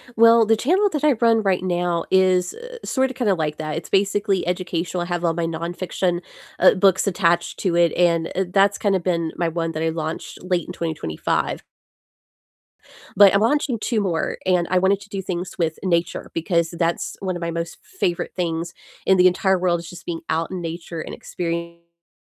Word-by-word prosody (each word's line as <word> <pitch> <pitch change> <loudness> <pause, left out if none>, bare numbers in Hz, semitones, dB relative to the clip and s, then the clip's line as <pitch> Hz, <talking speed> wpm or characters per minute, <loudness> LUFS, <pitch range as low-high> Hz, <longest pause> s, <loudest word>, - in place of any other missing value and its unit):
Well, 230 0 +6
the 225 +1 +4
channel 370 - +2
that 300 -3 -3
I 300 -3 +5
run 230 -1 +3
right 190 -2 +1
now 175 -2 0
is, 185 -1 +3
eh, 485 +1 -10
sorta, 265 0 0
kinda 225 -7 +1
like 155 -2 -2
that, 155 -1 -4
it's - - -7
basically 200 -1 +1
educational, 180 -1 -2
I - - -5
have 175 -1 -2
all 165 - +2
my 165 0 -1
nonfiction, 175 +2 -2 0.4
uh, - - +7
books 190 +1 +3
attached 175 -3 +1
to 180 -4 0
it, 170 -1 +4
and, 170 -2 +2
uh, 190 - +1
that's 200 +1 +3
kinda 195 -3 +1
been 170 -2 -1
my 170 -1 0
one 165 0 -2
that 155 +1 -3
I 165 - +1
launched 160 0 -5
late 180 -2 0
in 180 - -6
2025. 160 - -2 1.5
But 200 -1 +8
I'm 200 - +3
launching 250 0 +1
2 225 0 0
more, 180 -5 -1
and 180 -2 +2
I 185 - +2
wanted 190 +2 +3
to - - -14
do 195 -1 -4
things 180 -1 -4
with 165 -3 -1
nature, 170 -2 -1
because 170 0 +1
that's 170 0 -2
one 185 -2 -3
of 175 - -6
my 170 - -2
most 165 0 -4
favorite 180 - -2
things 170 -1 -3 0.3
in 190 - +5
the 180 - +5
entire 190 +1 +3
world, 175 -1 +1
is 170 0 -9
just 175 +1 -11
being 165 -2 -4
out 165 +1 -1
in 185 -1 -4
nature 165 0 -5
and - - -7
experiencing 170 0 -6
180 Hz, 195 wpm, -22 LUFS, 170-195 Hz, 1.5 s, But